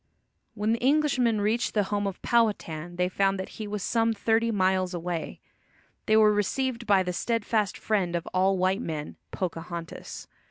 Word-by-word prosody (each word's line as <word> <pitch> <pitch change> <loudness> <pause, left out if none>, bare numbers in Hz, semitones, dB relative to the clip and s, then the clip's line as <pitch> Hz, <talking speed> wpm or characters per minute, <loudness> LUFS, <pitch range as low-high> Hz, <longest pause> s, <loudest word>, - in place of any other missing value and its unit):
When 210 +1 0
the 230 - -3
Englishmen 260 -6 +2
reached 220 +4 0
the 210 - +3
home 205 0 0
of 195 - -5
Powhatan 175 -8 0
they 180 +1 +1
found 195 +1 +1
that 190 - -5
he 215 - -4
was 205 -2 -4
some 230 -1 +1
thirty 225 +2 +1
miles 185 -3 +1
away. 175 -1 -4 0.7
They 215 - +5
were 215 -1 +6
received 235 +3 -1
by 195 -3 +4
the 180 0 -3
steadfast 220 -1 0
friend 190 -5 0
of 170 - -2
all 190 +1 +3
white 185 +4 +1
men, 155 -7 -5
Pocahontas. 170 -1 -6
205 Hz, 165 wpm, -27 LUFS, 180-225 Hz, 0.7 s, were